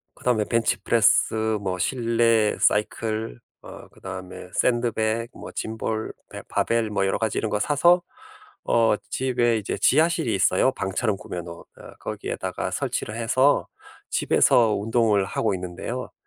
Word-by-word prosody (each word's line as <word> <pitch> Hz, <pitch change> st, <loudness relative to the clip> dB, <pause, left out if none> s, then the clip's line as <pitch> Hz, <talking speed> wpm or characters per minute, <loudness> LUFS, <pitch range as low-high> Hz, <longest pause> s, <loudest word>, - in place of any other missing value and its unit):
그다음에 115 Hz, -4 st, 0 dB
벤치프레스, 110 Hz, -1 st, +2 dB
뭐 95 Hz, -2 st, -3 dB
실내 115 Hz, 0 st, +2 dB
사이클, 110 Hz, -, 0 dB, 0.2 s
어 -, -, -11 dB
그다음에 95 Hz, -1 st, -9 dB
샌드백, 115 Hz, -1 st, 0 dB
뭐 -, -, -10 dB
짐볼, 110 Hz, 0 st, -3 dB, 0.2 s
베 -, -, -8 dB
바벨 115 Hz, -2 st, 0 dB
뭐 95 Hz, -2 st, 0 dB
여러 95 Hz, -, 0 dB
가지 110 Hz, -2 st, -1 dB
이런 110 Hz, -, -2 dB
거 105 Hz, -, 0 dB
사서 170 Hz, +6 st, +4 dB, 0.6 s
어 115 Hz, -2 st, +3 dB, 0.2 s
집에 120 Hz, -3 st, +1 dB
이제 100 Hz, -1 st, -4 dB
지하실이 160 Hz, -2 st, +2 dB
있어요, 95 Hz, +7 st, +3 dB
방처럼 100 Hz, 0 st, -1 dB
꾸며 90 Hz, -1 st, -6 dB
놓은. 85 Hz, 0 st, -9 dB, 0.2 s
어 -, -, -12 dB
거기에다가 -, -, -4 dB
설치를 110 Hz, -, -3 dB
해서 130 Hz, +5 st, +2 dB, 0.4 s
집에서 115 Hz, -3 st, +3 dB
운동을 110 Hz, -1 st, +1 dB
하고 95 Hz, -, -1 dB
있는데요. 90 Hz, +8 st, -5 dB
110 Hz, 300 characters per minute, -24 LUFS, 100-120 Hz, 0.6 s, 사서